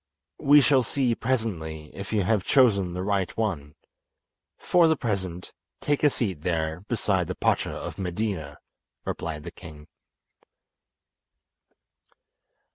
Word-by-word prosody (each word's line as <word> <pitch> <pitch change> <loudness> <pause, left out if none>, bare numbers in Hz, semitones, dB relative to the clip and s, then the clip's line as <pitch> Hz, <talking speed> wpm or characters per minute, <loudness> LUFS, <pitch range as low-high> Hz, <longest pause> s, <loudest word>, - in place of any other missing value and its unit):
'" - - -61
"We 145 +1 +7
shall 135 0 +4
see 125 +1 0
presently 90 -12 -3
if 100 - -7
you 105 -3 +2
have 100 0 +1
chosen 100 -10 +3
the 90 - -3
right 100 -2 0
one. 80 -10 -2 0.8
For 175 -2 +4
the 160 - +3
present 95 - -3 0.3
take 145 0 0
a 150 - +7
seat 95 - -3
there 80 -1 -1
beside 95 -6 +1
the 90 - -4
Pacha - - +1
of - - -6
Medina," 90 -5 -3 0.5
replied 75 -2 -4
the - - -7
king. 75 -2 -12
95 Hz, 125 wpm, -26 LUFS, 85-115 Hz, 0.8 s, We